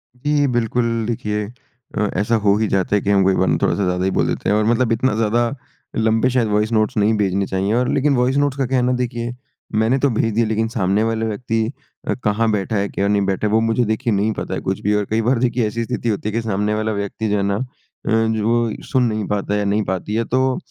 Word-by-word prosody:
जी। 145 +3 +1
बिल्कुल 115 -2 0
देखिए 105 -2 -2 0.5
अ, 105 0 +1
ऐसा 105 +3 +1
हो 105 -2 +3
ही 110 0 +1
जाता 95 +1 +1
है 100 - +2
कि - - -2
हम 100 -1 +4
कई 95 - +4
बार - - +1
ना - - +2
थोड़ा-सा 100 - +1
ज़्यादा 90 0 0
ही 95 - +1
बोल - - +1
देते - - -2
हैं 105 - +3
और 110 - +2
मतलब 120 +1 +2
इतना 130 +3 +1
ज़्यादा 115 +2 +1 0.5
लंबे 110 +2 +2
शायद 125 -3 +1
वॉइस 105 +1 +1
नोट्स 110 -1 +1
नहीं 105 +1 +3
भेजने 100 -1 +1
चाहिए 95 +3 -1
और 125 +1 +1
लेकिन 140 0 +2
वॉइस 125 +2 +2
नोट्स 145 -1 +1
का 135 - +1
क्या 130 - +1
है 125 - +2
ना 125 - +2
देखिए 120 -1 -3 0.5
मैंने 120 +4 +2
तो 140 - +2
भेज 115 -1 0
दिए 115 +2 +2
लेकिन 110 +1 0
सामने 100 -1 +1
वाले 115 0 -1
व्यक्ति 115 +1 -2 0.5
अ, - - +1
कहाँ 110 +2 +1
बैठा 105 +1 -1
है 100 0 +1
क्या 100 - -1
नहीं 100 0 +2
बैठा 95 +2 0
है - - -2
वो 110 - +5
मुझे 115 +2 +1
देखिए 110 +2 0
नहीं 105 +2 +1
पता - - -4
है - - -2
कुछ 95 0 -2
भी 105 +1 +1
और 105 -1 0
कई 110 +1 +1
बार 120 +2 +1
देखिए 120 -2 +1
ऐसी 115 +2 -3
स्थिति 115 +1 -2
होती 105 0 -1
है - - -6
कि 115 - 0
सामने 105 -1 -1
वाला 110 +1 -1
व्यक्ति 100 +2 -3
जो 105 - +1
है 100 - 0
ना 100 0 0
अ, 130 - -2 0.4
जो 110 0 +1
सुन 130 -2 +3
नहीं 110 -3 -1
पाता 105 -1 -1
है 105 - +1
या 105 - -1
नहीं 105 +2 +1
पाती 95 +3 -3
है। 115 - +1
तो 130 +1 +1
110 Hz, 260 wpm, -20 LUFS, 105-120 Hz, 0.5 s, वो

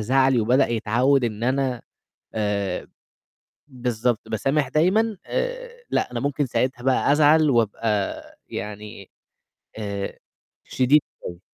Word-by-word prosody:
زعلي 130 +2 +3
وبدأ 125 +5 +3
يتعوّد 120 +4 +2
إن 110 -1 -3
أنا 130 -1 0 0.5
آآ 100 -3 -1 0.8
بالضبط، 120 -3 -2
باسامح 135 +6 0
دايمًا، 205 - +2
آآ - - -4
لأ، - - 0
أنا 120 - -3
ممكن 140 +1 -1
ساعتها 120 +1 -1
بقى 130 +2 +2
أزعل 150 +1 +5
وأبقى 110 -3 0 0.3
يعني 105 -1 -7 0.7
آآ 100 -2 -4 0.5
شديد 135 +4 +3 0.3
أوي. 85 0 -7
125 Hz, 110 wpm, -23 LUFS, 110-140 Hz, 0.8 s, أزعل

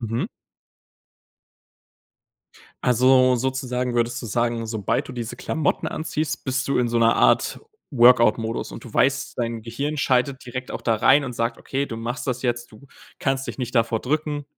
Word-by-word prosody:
Mhm. 115 0 -2 2.6
Also, 130 +1 +4
sozusagen 125 -1 -2
würdest 120 +1 0
du - - -5
sagen, 115 +1 -1
sobald 110 -3 -1
du - - -7
diese 120 -2 -5
Klamotten 160 -2 -1
anziehst, 155 -1 -3
bist 130 0 -1
du 140 - +1
in 125 -1 +2
so 120 - -1
einer 115 0 +4
Art - - +3 0.3
Workout-Modus 120 -3 +4
und - - -9
du 120 - -11
weißt, 135 -1 +1
dein 115 -2 -2
Gehirn 140 +7 -3
schaltet 130 -1 +1
direkt 130 +1 -6
auch - - -5
da 115 -2 +1
rein 135 +6 +4
und 130 - -5
sagt: 115 0 -2
„Okay, 140 +1 -3
du 115 - -6
machst 120 +4 -4
das 125 -2 -2
jetzt, 120 -2 -2
du 110 +6 -15 0.3
kannst 135 0 -1
dich - - -6
nicht 125 -1 -4
davor 115 -2 +2
drücken.“ 150 +1 -2
125 Hz, 170 wpm, -23 LUFS, 115-135 Hz, 2.6 s, Also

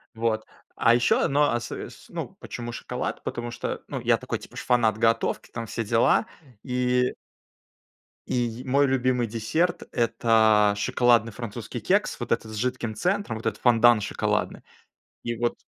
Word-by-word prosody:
Вот. 110 -1 -1 0.3
А 115 - +4
еще 120 0 +3
одно, 145 +1 +3
осо 120 - -4
с - - -15
ну, - - -6
почему 120 0 -6
шоколад? 125 +1 -4
Потому 120 0 -4
что, - - -4
ну, - - -4
я - - +3
такой, - - -4
типа, - - -14
ж - - -3
фанат 115 -3 +2
готовки, 115 0 +1
там 115 -1 -5
все 115 +1 -3
дела. 115 0 +3 0.4
И 125 -1 +1 1.2
И, 120 0 -1
мой 140 +2 +3
любимый 130 -2 +1
десерт- 115 +11 -1
это 110 -3 +3
шоколадный 115 +2 +2
французский 115 +1 -6
кекс, 205 - +1
вот 120 - -5
этот 110 -1 -4
с - - -7
жидким 120 -1 -2
центром, 180 - -1
вот 115 - -10
этот 110 -2 -2
фондан 120 -2 +5
шоколадный. - - -2 0.6
И 120 -1 -3
вот 120 +1 0
120 Hz, 155 wpm, -25 LUFS, 110-125 Hz, 1.2 s, фондан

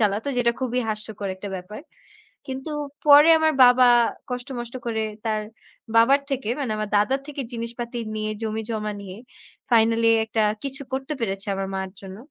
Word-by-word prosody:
চালাতো 210 +4 +1
যেটা 235 -1 +3
খুবই 250 -1 0
হাস্যকর 215 -2 -5
একটা 200 +2 -7
ব্যাপার। 185 +5 -9 0.7
কিন্তু 265 +3 -5 0.3
পরে 295 +2 +8
আমার 315 0 +3
বাবা 250 0 +6 0.4
কষ্ট-মষ্ট 245 -1 -5
করে 220 -1 -1 0.2
তার 215 -1 0 0.5
বাবার 270 +5 +5
থেকে 255 -5 -2
মানে 265 -6 -2
আমার 215 -1 -3
দাদার 260 +7 +1
থেকে 290 -1 -5
জিনিসপাতি 235 +1 -5 0.2
নিয়ে 215 0 -2
জমি 220 0 -2
জমা 215 -1 -2
নিয়ে 190 -1 -9 0.5
ফাইনাললি 230 0 +4 0.2
একটা 220 0 0 0.2
কিছু 275 +1 -5
করতে 265 +3 -2
পেরেছে 195 -2 -3
আমার, 195 0 -3
মার 190 0 -3
জন্য। 190 -1 -9
230 Hz, 155 wpm, -24 LUFS, 215-260 Hz, 0.7 s, পরে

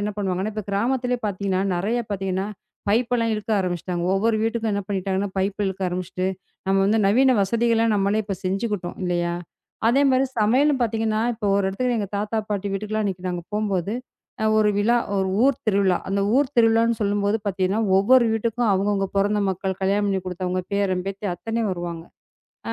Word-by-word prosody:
என்ன 210 +1 -2
பண்ணுவாங்கன்னா, 190 +1 -1
இப்ப 215 -2 -4
கிராமத்திலேயே 245 +4 0
பார்த்தீங்கன்னா, 195 -1 -1 0.2
நறைய 215 +7 0
பாத்தீங்கன்னா, 190 -1 -2 0.4
பைப்லாம் 230 +1 +2
இழுக்க 215 +1 -5
ஆரம்பிச்சிட்டாங்க. 175 -1 -2
ஒவ்வொரு 220 +3 +2
வீட்டுக்கும் 225 -1 0
என்ன 200 0 -1
பண்ணிட்டாங்கன்னா, 195 0 -1
பைப் 195 +2 -1
இழுக்க 190 0 -3
ஆரம்பிச்சிட்டு, 185 +1 -3 0.4
நம்ம 195 0 +2
வந்து 215 +2 +3
நவீன 255 +5 +4
வசதியெல்லாம் 230 +1 +2
நம்மளே 200 +2 +1
இப்ப 200 -1 -3
செஞ்சுக்கிட்டோம் 195 -1 -2
இல்லயா! 175 -1 0 0.5
அதேமாரி 265 +2 +4
சமையலும் 260 +6 +3
பார்த்தீங்கன்னா 225 -2 0
இப்ப 225 -2 -7
ஒரு 200 0 +2
இடத்துல 245 +6 -1
எங்க 205 - -1
தாத்தா, 210 +2 -2
பாட்டி 205 -1 -1
வீட்டுக்கு 205 +2 -4
எல்லாம் 215 0 0
அன்னைக்கி 185 -2 -3
நாங்க 175 -1 -3
போம்போது, 205 -2 -1 0.5
அ - - +3
ஒரு 210 -1 +4
விழா, 230 +4 +3 0.2
ஒரு 190 -1 +1 0.2
ஊர் 275 +1 +3
திருவிழா. 195 -3 +3
அந்த 200 +1 0 0.2
ஊர் 280 -1 +3
திருவிழான்னு 230 0 +4
சொல்லும்போது 205 0 +1
பாத்தீங்கன்னா, 190 +2 0 0.2
ஒவ்வொரு 245 +5 +5
வீட்டுக்கும் 230 +1 0
அவுங்க, 195 +2 +1
அவுங்க 195 -1 -1
பொறந்த 205 +1 +2
மக்கள், 190 +1 -2
கல்யாணம் 200 +2 +2
பண்ணி 195 -1 0
குடுத்தவுங்க, 185 0 -2
பேரன், 190 -2 0
பேத்தி 195 +1 -5
அத்தனையும் 225 +3 -2
வருவாங்க. 170 -2 -5 0.7
ஆ - - -1
205 Hz, 170 wpm, -23 LUFS, 190-225 Hz, 0.7 s, ஒவ்வொரு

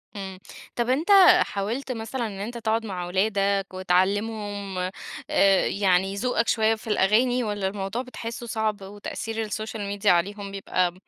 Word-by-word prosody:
إمم، 190 -2 -7 0.4
طب 240 0 -1
أنتَ 295 +9 0 0.3
حاولت 225 +7 -2
مثلًا 230 +1 -3
إن 200 -2 -8
أنتَ 230 +4 -5
تقعُد 225 0 -1
مع 185 -3 -4
أولادك، 195 +1 +1
وتعلِّمهم 200 +2 -1 0.5
آآ 195 -1 +4
يعني 195 -1 +1
ذوقك 240 +2 0
شويَّة 220 0 +3
في 220 +1 -13
الأغاني، 230 +5 +3
والّا 205 -3 -2
الموضوع 195 +4 -3
بتحِسُّه 240 -2 -7
صعب 220 -2 -1
وتأثير 205 +3 -5
السوشيال 215 0 -4
ميديا 200 0 +2
عليهم 200 +3 0
بيبقى 185 -2 0
205 Hz, 140 wpm, -25 LUFS, 195-225 Hz, 0.5 s, آآ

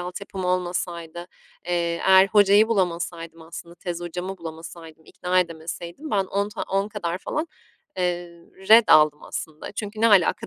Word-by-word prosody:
altyapım 185 +1 -6
olmasaydı, 175 -2 -2 0.5
eee, 170 -1 -1
eğer 190 0 +7
hocayı 205 +1 +5
bulamasaydım 170 -5 -2
aslında, 170 +1 -10
tez 175 0 -6
hocamı 180 +2 -5
bulamasaydım, 165 -1 -10
ikna 180 +3 0
edemeseydim 170 - -6
ben 195 -2 +1
on 200 +2 -2
ta 210 - -6
10 195 +1 -1
kadar 180 -5 -4
falan, 305 - -3 0.5
eee, 175 -1 -1 0.4
ret 225 +1 +8
aldım 150 -1 +5
aslında. 155 -1 -7
Çünkü 210 +1 -6
"ne 230 - +5
alaka?" 205 +2 +3
180 Hz, 145 wpm, -24 LUFS, 170-195 Hz, 0.5 s, ret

